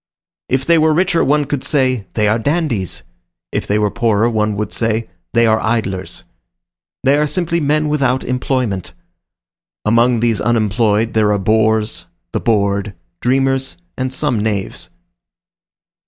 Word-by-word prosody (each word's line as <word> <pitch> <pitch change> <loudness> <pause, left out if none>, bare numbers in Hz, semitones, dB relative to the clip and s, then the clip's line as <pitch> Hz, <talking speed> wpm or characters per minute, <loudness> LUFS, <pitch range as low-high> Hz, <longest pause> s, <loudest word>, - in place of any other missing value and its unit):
If 130 +1 0
they 170 +1 +4
were 155 0 +3
richer, 180 0 +2
one 150 +1 +2
would 145 -3 -1
say, 130 -7 +1
"They 105 -1 +2
are 110 +2 +2
dandies;" 125 - -1 0.5
if - - -2
they 105 - +1
were 105 -1 +1
poorer, 115 0 +1
one 105 -1 0
would 105 0 -3
say, 115 -3 -1 0.2
"They 115 0 +4
are 110 0 +3
idlers." 105 -5 -2 0.8
They 135 +2 +4
are 150 0 +2
simply 170 +1 0
men 155 0 +1
without 135 -4 +1
employment. 125 -6 -2 0.9
Among 115 +2 +3
these 115 -2 +1
unemployed 110 -1 +1
there 105 -1 +3
are 105 - +2
bores, 110 -3 +1 0.2
the - - -1
bored, 100 -3 0 0.3
dreamers, 135 +1 +1 0.2
and 130 0 -2
some 130 -3 0
knaves. 100 -5 -3
115 Hz, 140 wpm, -17 LUFS, 105-135 Hz, 0.9 s, they